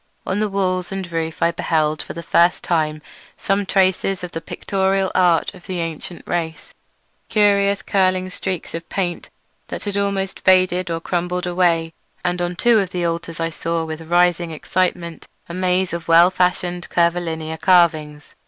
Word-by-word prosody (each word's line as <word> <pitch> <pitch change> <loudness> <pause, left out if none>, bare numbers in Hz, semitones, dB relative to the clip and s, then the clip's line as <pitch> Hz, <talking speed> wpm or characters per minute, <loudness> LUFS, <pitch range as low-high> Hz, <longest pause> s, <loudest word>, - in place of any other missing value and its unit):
On 190 +2 -1
the 215 0 0
walls 185 -2 -1
and 190 -3 -5
roof 165 -1 -2
I 170 - +4
beheld 155 -2 0
for - - -8
the 170 - -7
first 170 +2 +3
time 155 -3 0 0.3
some 195 0 0
traces 190 0 +1
of 180 - -5
the 165 - -5
pictorial 190 +2 -1
art 175 -3 +3
of 180 - -15
the 185 -2 -3
ancient 165 +1 -5
race, 165 -2 -3 0.6
curious 200 -2 +3
curling 185 -1 +1
streaks 185 -2 -4
of 165 0 -6
paint 180 -3 -3 0.4
that - - -6
had 205 -1 -3
almost 200 -1 -1
faded 185 -1 +3
or 165 0 -2
crumbled 180 +1 -2
away; 170 -2 +1 0.3
and 175 0 0
on 175 0 -2
two 235 +4 +4
of 195 -3 -1
the 180 -1 -2
altars 165 0 -3
I 165 0 -1
saw 165 0 -2
with 160 0 -6
rising 175 -1 +3
excitement 170 0 -2 0.2
a 170 - -8
maze 185 0 0
of 170 -1 -5
well 170 +2 +6
fashioned 180 -1 -1
curvilinear 165 -2 0
carvings. 155 -5 +2
175 Hz, 165 wpm, -20 LUFS, 165-185 Hz, 0.6 s, well